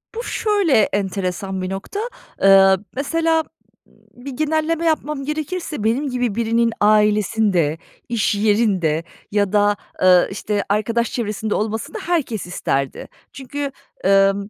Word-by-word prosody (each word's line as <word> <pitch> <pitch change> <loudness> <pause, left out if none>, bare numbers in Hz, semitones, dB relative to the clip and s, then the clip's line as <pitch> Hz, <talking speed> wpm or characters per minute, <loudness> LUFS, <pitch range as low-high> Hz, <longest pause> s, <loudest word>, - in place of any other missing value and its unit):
Bu 470 - -4
şöyle 410 - +1
enteresan 190 -1 -2
bir 185 - -3
nokta, 195 - -5 0.4
ııı, 195 0 +6
mesela 325 +3 +1
b 315 - -30 0.7
bir 280 - -4
genelleme 315 +4 0
yapmam 300 -3 0
gerekirse, 305 - -4
benim 250 +6 0
gibi 245 -4 -1
birinin 230 0 +1
ailesinde, 210 -5 +2 0.3
iş 215 -4 +1
yerinde 200 -7 +1 0.3
ya 205 -1 +1
da, 205 0 +3 0.3
ııı, 180 -1 +6
işte, 205 +1 -2
arkadaş 225 +3 0
çevresinde 215 -2 -2
olmasını 220 - -3
herkes 310 - -1
isterdi. 140 -6 -2 0.3
Çünkü, 280 +1 -5 0.4
ımm, 195 +1 +3
215 Hz, 120 wpm, -20 LUFS, 195-285 Hz, 0.7 s, ııı